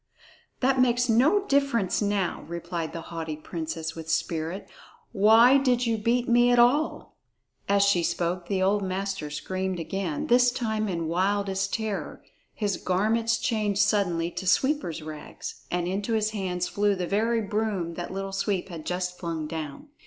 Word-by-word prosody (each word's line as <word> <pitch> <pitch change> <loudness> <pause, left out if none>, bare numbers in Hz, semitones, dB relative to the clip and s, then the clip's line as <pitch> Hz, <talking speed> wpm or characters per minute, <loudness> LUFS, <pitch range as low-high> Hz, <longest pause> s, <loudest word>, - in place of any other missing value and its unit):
"That 265 0 +3
makes 245 0 +2
no 305 - +4
difference 275 - +1
now," 205 -3 -1
replied 170 -1 -4
the 165 - -6
haughty 160 -2 -4
princess 160 0 -5
with 160 -1 -8
spirit; 165 +3 -2 0.4
"why 230 +6 +6
did 250 -2 +2
you 230 -1 +1
beat 240 +3 +1
me 240 +1 +5
at 245 - +4
all?" 255 +6 +2 0.5
As 200 0 +4
she 200 -3 +3
spoke, 175 +1 -1
the 190 -2 0
old 200 +2 +2
master 190 -4 -3
screamed 185 +4 -3
again, 170 -1 -3
this 245 +1 +5
time 220 -4 -2
in 170 -3 -2
wildest 195 +3 0
terror. 220 -3 -4 0.3
His 205 -3 -1
garments 225 +5 +1
changed 210 -3 +1
suddenly 175 -5 +1
to 190 - -6
sweeper's 180 - +1
rags, 155 -1 -8
and 175 0 -1
into 200 +5 -2
his 215 -1 +1
hands 180 -4 -2
flew 205 0 +1
the 180 -1 -2
very 225 +5 +1
broom 205 -5 -2
that 175 +1 -5
Little 195 0 -4
Sweep 195 -1 -1
had 165 -3 -8
just 180 0 -3
flung 165 -3 -3
down! 160 - -6
195 Hz, 160 wpm, -26 LUFS, 175-225 Hz, 0.5 s, why